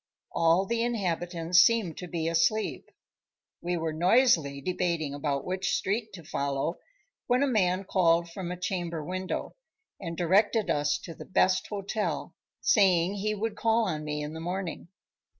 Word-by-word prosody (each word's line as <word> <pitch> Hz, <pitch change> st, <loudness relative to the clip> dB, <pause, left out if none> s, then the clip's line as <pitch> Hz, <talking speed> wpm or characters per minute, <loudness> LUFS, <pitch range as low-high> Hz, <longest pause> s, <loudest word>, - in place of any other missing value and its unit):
All 170 Hz, +3 st, +3 dB
the 230 Hz, +3 st, -1 dB
inhabitants 175 Hz, -6 st, +1 dB
seemed 210 Hz, -6 st, +4 dB
to 180 Hz, -, -6 dB
be 165 Hz, -1 st, -2 dB
asleep. 165 Hz, +7 st, 0 dB, 0.7 s
We 175 Hz, 0 st, -1 dB
were 160 Hz, -1 st, -2 dB
noisily 170 Hz, -, +3 dB
debating 170 Hz, -2 st, -1 dB
about 145 Hz, -1 st, -2 dB
which 190 Hz, +1 st, -1 dB
street 215 Hz, +3 st, -1 dB
to 175 Hz, -3 st, -10 dB
follow, 140 Hz, +3 st, -2 dB, 0.5 s
when 250 Hz, +2 st, +3 dB
a -, -, +2 dB
man 190 Hz, -6 st, +1 dB
called 170 Hz, -3 st, +2 dB
from 180 Hz, 0 st, -5 dB
a 180 Hz, -, -4 dB
chamber 175 Hz, -4 st, -3 dB
window, 185 Hz, +2 st, -4 dB, 0.5 s
and 170 Hz, -3 st, -6 dB
directed 205 Hz, +5 st, +2 dB
us 145 Hz, 0 st, +1 dB
to 165 Hz, -, -7 dB
the -, -, -10 dB
best 185 Hz, 0 st, +2 dB
hotel, 205 Hz, +1 st, -3 dB, 0.3 s
saying 190 Hz, -, +3 dB
he 215 Hz, +2 st, -1 dB
would 215 Hz, +1 st, -3 dB
call 225 Hz, +1 st, +2 dB
on 155 Hz, -4 st, -3 dB
me 150 Hz, 0 st, -3 dB
in 150 Hz, +1 st, -5 dB
the 160 Hz, -, -6 dB
morning. 175 Hz, 0 st, -4 dB
180 Hz, 155 wpm, -28 LUFS, 165-205 Hz, 0.7 s, seemed